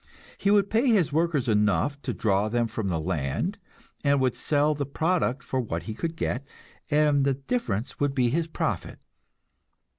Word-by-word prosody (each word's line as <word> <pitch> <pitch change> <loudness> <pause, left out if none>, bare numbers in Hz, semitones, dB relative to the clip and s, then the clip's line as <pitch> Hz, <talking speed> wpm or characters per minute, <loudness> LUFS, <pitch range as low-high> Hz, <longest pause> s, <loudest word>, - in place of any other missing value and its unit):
He 200 - 0
would 200 -1 +3
pay 230 +5 +3
his 195 - +3
workers 160 -5 +1
enough 110 +6 +2
to 130 - -3
draw 105 -2 +1
them 120 +1 +1
from 110 -2 -3
the 85 -4 0
land, 75 -5 -2 0.4
and 140 -1 +3
would 130 -2 +1
sell 150 0 +2
the 145 -1 -2
product 160 -3 0
for 130 - -2
what 85 -9 -3
he 110 - -5
could 165 +8 -3
get, 140 -4 -2 0.5
and 150 -2 +3
the 135 -1 +2
difference 135 - -3
would 145 -1 0
be 125 -3 +3
his 165 +3 0
profit. 160 - -3
140 Hz, 175 wpm, -26 LUFS, 110-160 Hz, 0.5 s, would